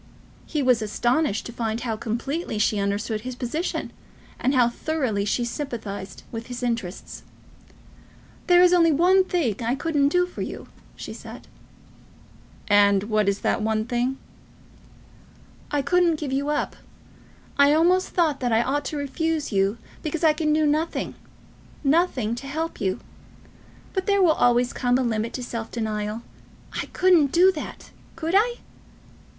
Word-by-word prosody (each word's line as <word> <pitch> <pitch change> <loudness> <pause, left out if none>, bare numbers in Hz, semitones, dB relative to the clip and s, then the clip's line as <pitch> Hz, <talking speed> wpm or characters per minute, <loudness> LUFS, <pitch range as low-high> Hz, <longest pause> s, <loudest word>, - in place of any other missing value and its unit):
He 300 -3 -1
was 250 -3 +3
astonished 240 +3 0
to 235 - -7
find 230 -1 -2
how 230 -2 -2
completely 235 +6 -3
she 210 0 +1
understood 205 +2 -1
his 255 +2 -6
position, 275 +8 -3 0.5
and 265 +2 +1
how 245 -2 +5
thoroughly 240 -6 -1
she 240 +3 0
sympathised 220 - -6
with 230 0 -6
his 245 0 -6
interests. 230 -7 -4 1.3
"There 355 -1 +7
is 360 0 +5
only 335 -2 +5
one 360 +5 +4
thing 325 - 0
I 235 +3 +1
couldn't 290 -1 +1
do 360 +5 +2
for 360 - -8
you," - - -6 0.3
she - - -7
said. - - -11 1.2
"And 200 -2 +4
what 215 -2 +3
is 200 0 -2
the - - +2
one 220 0 0
thing?" 245 +2 -1 1.5
"I 290 -1 0
couldn't 350 -2 +2
give 290 -3 -4
you 280 +2 0
up. 300 - -1 0.8
I 280 0 +7
almost 350 +4 +3
thought 320 -5 +1
that 245 -2 -1
I 225 +1 +3
ought 285 +3 -1
to 300 - -3
refuse 305 +2 -2
you 195 +2 +1 0.2
because 315 +2 -3
I 315 -1 +6
can 305 0 0
do 310 0 +3
nothing, 310 +3 0 0.7
nothing 275 -7 +2
to 275 - -9
help 320 +4 -4
you. 190 -2 -1 0.9
But 380 +1 -2
there 400 -1 +4
will 340 - +6
always 245 -3 +2
come 245 -1 +1
a 260 - 0
limit 225 -1 -1
to 255 - -4
self 230 -2 -5
denial. 215 0 -3 0.5
I - - -3
couldn't 350 -7 +3
do 365 +3 +6
that! 310 -5 -8 0.2
Could 330 +1 -3
I?" 475 +4 +3
265 Hz, 155 wpm, -24 LUFS, 225-320 Hz, 1.5 s, There